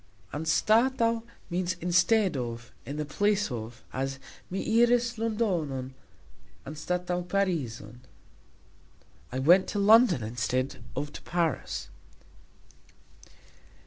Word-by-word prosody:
"Anstataux" 230 - +2 0.3
means 180 +1 -1
"instead 180 +2 +3
of, 120 -2 -5 0.2
in 140 +2 -5
the 150 - -2
place" 205 +4 +1
of, 115 +1 -6
as 135 +1 -2 0.3
"Mi 220 +5 +1
iris 240 0 +3
Londonon 175 - -1 0.7
anstataux 180 +4 -3
Parizon", 140 - -2 1.3
I 130 - -3
went 175 +8 +5
to - - -3
London 205 - +5
instead 120 +3 -2
of 145 +2 -4
to - - -8
Paris. 170 -6 -2
175 Hz, 95 wpm, -28 LUFS, 130-210 Hz, 1.3 s, went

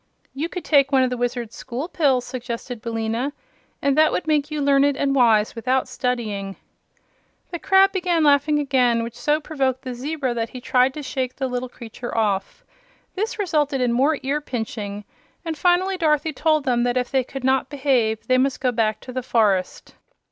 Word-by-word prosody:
"You 305 +5 -3
could 360 - -6
take 280 -2 +4
one 265 -1 +4
of 255 - 0
the - - -1
Wizard's 240 -2 -3
School 255 +7 -5
Pills," 280 -8 +1
suggested 245 -1 -6
Billina, 230 +4 -2 0.5
"and 280 -1 +2
that 310 +1 +5
would - - -2
make 300 -2 +1
you 305 -1 -3
learned 280 0 +3
and 275 -1 +1
wise 225 -5 +3
without 255 +3 0
studying." 225 -7 -3 1.0
The 345 - -4
crab 385 +2 +4
began 355 -4 +1
laughing 290 +1 +4
again, 250 -5 +2
which 230 0 -6
so 300 +3 +1
provoked 265 -5 -2
the 255 - -5
zebra 270 0 -3
that 230 -1 -2
he 255 - -8
tried 255 +1 +2
to 300 - -6
shake 260 -1 -3
the 265 - -2
little 250 0 -3
creature 240 0 -8
off. 200 -3 -1 0.5
This 435 +5 -3
resulted 300 -9 0
in 245 -2 +1
more 280 +5 +2
ear 285 +3 -1
pinching, 215 -6 -5 0.4
and 325 -1 -3
finally 365 +4 +2
Dorothy 310 -2 +1
told 310 +1 +1
them 245 -3 +1
that 245 +1 +1
if 250 0 -1
they 265 -1 +2
could 270 +1 -8
not 265 0 +1
behave 260 -6 0
they 255 -1 +3
must 265 0 +1
go 255 -2 +1
back 220 -2 0
to 255 - -9
the 255 - -2
forest. 210 -7 0
260 Hz, 190 wpm, -22 LUFS, 240-295 Hz, 1.0 s, that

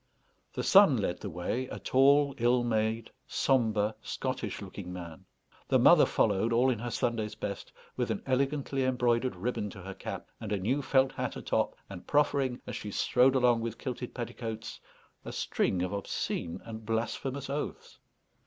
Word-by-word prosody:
The - - -3
son 195 -9 +7
led 95 -4 -1
the 100 - -5
way, 95 +9 -2
a - - -6
tall, 140 +2 +4
ill 120 +1 +3
made, 110 -1 0 0.2
sombre, 110 -5 +1
Scottish - - -3
looking 90 - -8
man; 85 -3 -8 0.4
the - - +4
mother - - +7
followed, 105 +2 +2
all 125 +3 +4
in 115 - -2
her 120 +2 -4
Sunday's 115 -2 -1
best, 100 -1 -5 0.2
with - - -1
an - - -2
elegantly 135 +1 0
embroidered 125 -1 +1
ribbon 115 -4 -2
to 95 - -10
her 95 +1 -6
cap, - - -7
and 105 - -6
a 105 - +1
new 120 +10 0
felt 135 -1 +3
hat - - -3
atop, - - -1
and 95 -3 -10
proffering, 140 -3 +2
as - - -5
she 105 - -5
strode 125 +5 +3
along 120 -3 +4
with 115 -1 -4
kilted 125 -1 -5
petticoats, 115 -2 -5 0.4
a - - -6
string 90 -2 0
of 90 - -2
obscene 95 -4 -3
and 110 -1 -7
blasphemous 115 +5 -2
oaths. 140 +2 -5
120 Hz, 165 wpm, -30 LUFS, 105-130 Hz, 0.4 s, son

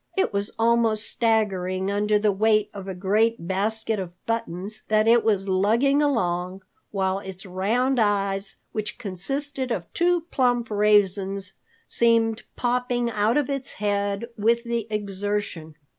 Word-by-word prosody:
It 385 - +1
was 200 +1 -1
almost 225 -1 +2
staggering 195 -4 0
under 210 +1 +2
the 210 0 +2
weight 215 +1 +2
of 195 -2 -8
a 190 - -4
great 210 +2 +1
basket 215 +3 -1
of 180 -2 -5
buttons 215 -3 -2
that 215 0 +3
it 235 0 +5
was 200 -3 +1
lugging 225 +10 +3
along, 185 -9 -1 0.3
while 190 -1 -1
its 190 -1 -9
round 225 +8 0
eyes, 200 -2 0 0.2
which 215 +1 -3
consisted 260 +8 -2
of 190 -8 -2
two 350 0 +2
plump 245 -3 +1
raisins, 200 -2 +2 0.3
seemed 230 -1 +2
popping 245 -1 0
out 215 +3 +1
of 295 - +1
its 275 -2 -3
head 200 +1 -1
with 235 +2 +2
the 235 -2 -2
exertion. 205 -5 -3
210 Hz, 140 wpm, -24 LUFS, 195-235 Hz, 0.3 s, it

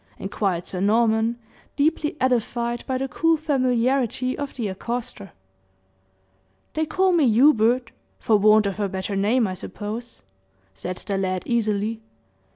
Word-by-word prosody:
inquired 190 -3 -2
Sir 185 - -5
Norman, 225 +2 +2 0.4
deeply 300 +1 0
edified 240 -1 0
by 260 - 0
the 270 +1 -2
cool 330 +5 +2
familiarity 255 -3 0
of 285 -1 -5
the 230 -5 -2
accoster. 225 +1 -5 1.4
"They 315 0 -1
call 375 +3 +2
me 310 -7 +4
Hubert 240 0 +4 0.3
for 220 - +2
want 215 +1 +5
of 200 +1 -3
a 200 -1 0
better 190 +2 -4
name, 220 +5 +2
I 190 - -2
suppose," 210 - -7 0.5
said 180 - -5
the 200 -2 -3
lad, 185 -1 -1
easily. 220 -1 -1
230 Hz, 135 wpm, -23 LUFS, 205-255 Hz, 1.4 s, want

